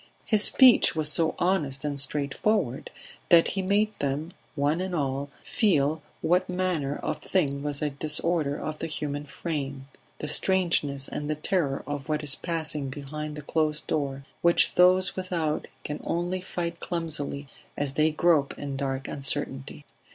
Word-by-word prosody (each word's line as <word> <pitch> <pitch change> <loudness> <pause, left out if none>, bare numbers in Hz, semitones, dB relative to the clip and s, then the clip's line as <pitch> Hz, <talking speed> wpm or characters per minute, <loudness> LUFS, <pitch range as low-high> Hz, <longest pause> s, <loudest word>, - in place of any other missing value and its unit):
His 215 -2 +4
speech 255 -5 +7
was 155 -1 +3
so 165 0 +2
honest 150 -7 0
and 145 -1 -2
straightforward 140 - -1 0.4
that 170 -1 +6
he 195 - -2
made 205 +3 +2
them 145 +5 -2 0.2
one 150 +4 +1
and 185 -1 -3
all 140 -2 -2
feel 155 - +1 0.2
what 180 +2 +2
manner 180 -6 -1
of - - -4
thing 140 -7 0
was 145 0 -3
a 150 - 0
disorder 150 +1 0
of 155 0 -5
the 165 - -3
human 145 -2 -4
frame 140 -2 -4 0.3
the 150 - -5
strangeness 150 -5 +1
and 145 0 -5
the 155 - 0
terror 150 -3 -1
of 145 +1 -5
what 150 0 -1
is 145 -2 +6
passing 155 -5 -2
behind 150 +2 -6
the 150 - -8
closed 155 0 0
door, 140 -2 -2 0.2
which 170 0 +4
those 185 +1 +4
without 170 -5 -2 0.2
can 150 - -5
only 175 +2 -2
fight 170 -2 -4
clumsily 150 -4 -3 0.3
as 140 -1 -1
they 155 +2 +3
grope 155 -2 +2
in 140 -1 -5
dark 135 -1 -3
uncertainty. 140 0 -1
150 Hz, 155 wpm, -27 LUFS, 140-170 Hz, 0.4 s, speech